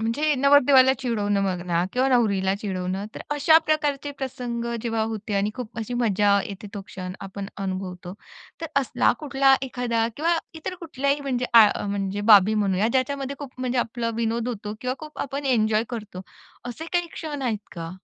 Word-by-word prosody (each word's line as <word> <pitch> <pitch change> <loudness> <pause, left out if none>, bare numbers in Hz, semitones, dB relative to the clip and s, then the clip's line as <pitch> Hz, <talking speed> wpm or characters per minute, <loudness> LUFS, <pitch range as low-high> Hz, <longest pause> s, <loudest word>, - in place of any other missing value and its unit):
म्हणजे 290 +7 +1
नवरदेवाला 270 -1 +6
चिडवणं 205 -6 0
म्हणा 175 -2 0
किंवा 255 +2 +2
नवरीला 200 -7 +2
चिडवणं, 190 -1 -3
तर - - -7
अशा 315 +3 +6
प्रकारचे 295 -2 0
प्रसंग 245 -3 -4 0.2
जेव्हा 225 -2 -1
होते 220 -2 -3
आणि 200 +1 +1
खूप 240 -3 -7
अशी 225 +2 -4
मजा 205 -4 +3
येते, 200 +1 -8
तो 200 - -4
क्षण 185 -1 -7
आपण 195 0 -6
अनुभवतो. 185 -2 -5 0.5
तर 330 - -3
असला 265 - +2
कुठला 275 -2 +4
एखादा 240 -3 -1
किंवा 335 +3 +2 0.2
इतर 320 +3 -5
कुठल्याही 280 -3 -1
आ - - -8
म्हणजे, 250 -2 -1 0.4
म्हणजे 200 0 -2
बाबी 205 +1 +7
म्हणूया 200 0 +1
ज्याच्यामध्ये 275 +1 -1
खूप 280 -3 -8
म्हणजे 255 -1 -1
आपला 230 0 -1
विनोद 230 +1 -1
होतो 210 -2 -5
किंवा 255 0 -2
खूप 305 -1 -10
आपण 280 +1 -5
एन्जॉय 215 +1 +2
करतो, 210 -5 -6 0.5
असे 310 +7 -6
काही 350 -1 +1
क्षण 295 -4 -5
आहेत 230 -4 0 0.2
का? 165 0 -5
235 Hz, 165 wpm, -24 LUFS, 200-270 Hz, 0.5 s, बाबी